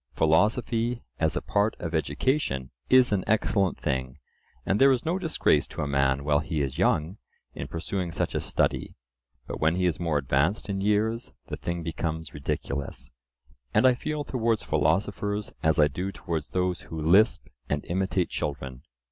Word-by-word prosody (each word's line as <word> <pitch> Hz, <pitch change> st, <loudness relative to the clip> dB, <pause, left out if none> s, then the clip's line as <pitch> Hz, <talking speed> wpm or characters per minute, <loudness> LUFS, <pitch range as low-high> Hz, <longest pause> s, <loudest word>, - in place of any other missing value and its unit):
Philosophy, 115 Hz, +8 st, +2 dB, 0.2 s
as 80 Hz, -1 st, +1 dB
a -, -, -2 dB
part 105 Hz, +1 st, +1 dB
of 85 Hz, -1 st, -4 dB
education, 80 Hz, -, 0 dB, 0.2 s
is 130 Hz, -2 st, +6 dB
an 100 Hz, -3 st, +1 dB
excellent 100 Hz, -3 st, +2 dB
thing, 65 Hz, 0 st, -2 dB, 0.5 s
and 100 Hz, -, +1 dB
there 135 Hz, 0 st, +8 dB
is 125 Hz, -2 st, 0 dB
no 175 Hz, +4 st, 0 dB
disgrace 155 Hz, -, +2 dB
to -, -, -4 dB
a -, -, -2 dB
man 70 Hz, -1 st, +1 dB
while 75 Hz, 0 st, +3 dB
he 80 Hz, +1 st, -3 dB
is 70 Hz, +4 st, -4 dB
young 85 Hz, 0 st, +1 dB, 0.4 s
in 70 Hz, -, -6 dB
pursuing 85 Hz, +3 st, -3 dB
such -, -, -2 dB
a -, -, 0 dB
study; -, -, -1 dB, 0.5 s
but -, -, -6 dB
when 80 Hz, +2 st, +2 dB
he 90 Hz, 0 st, +1 dB
is 85 Hz, -3 st, +1 dB
more 85 Hz, -4 st, +1 dB
advanced 70 Hz, -, +1 dB
in 95 Hz, -1 st, -1 dB
years, 110 Hz, +3 st, 0 dB, 0.2 s
the -, -, -2 dB
thing 85 Hz, -1 st, -4 dB
becomes 80 Hz, -1 st, -3 dB
ridiculous, 70 Hz, -2 st, -4 dB, 0.6 s
and -, -, +5 dB
I 130 Hz, -, +7 dB
feel 150 Hz, +4 st, -3 dB
towards 115 Hz, -5 st, 0 dB
philosophers 105 Hz, 0 st, 0 dB
as 80 Hz, 0 st, +2 dB
I 75 Hz, -2 st, +6 dB
do 90 Hz, +7 st, -4 dB
towards 80 Hz, -6 st, -4 dB
those 90 Hz, -1 st, -1 dB
who 80 Hz, -, -7 dB
lisp 95 Hz, +9 st, +4 dB, 0.2 s
and 75 Hz, 0 st, -1 dB
imitate 95 Hz, 0 st, 0 dB
children. 65 Hz, -3 st, -4 dB
85 Hz, 170 wpm, -27 LUFS, 75-105 Hz, 0.6 s, there